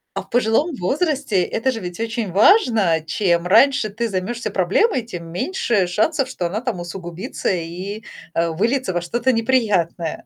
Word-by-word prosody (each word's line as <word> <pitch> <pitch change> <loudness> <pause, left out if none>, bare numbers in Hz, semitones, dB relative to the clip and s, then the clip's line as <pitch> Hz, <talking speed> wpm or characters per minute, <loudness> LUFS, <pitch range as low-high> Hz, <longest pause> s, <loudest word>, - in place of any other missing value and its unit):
А - - -2
в - - -18
пожилом 245 +7 +1
возрасте 270 - 0
это 245 +8 -1
же 225 - -5
ведь 180 0 -7
очень 225 -3 -3
важно. 215 - +4
Чем 170 0 +1
раньше 250 +2 +4
ты 230 +3 -3
займешься 215 +4 -3
проблемой, 210 - +1
тем 175 -7 -7
меньше 210 - 0
шансов, 265 - +1
что 180 -9 -2
она 205 +6 -3
там 245 -7 -3
усугубится 175 +4 -5
и, 185 +5 -5 0.3
а, 165 0 0
выльется 225 +5 0
во 175 - -1
что-то 240 +9 0
неприятное. 210 -9 0
215 Hz, 160 wpm, -20 LUFS, 175-245 Hz, 0.3 s, важно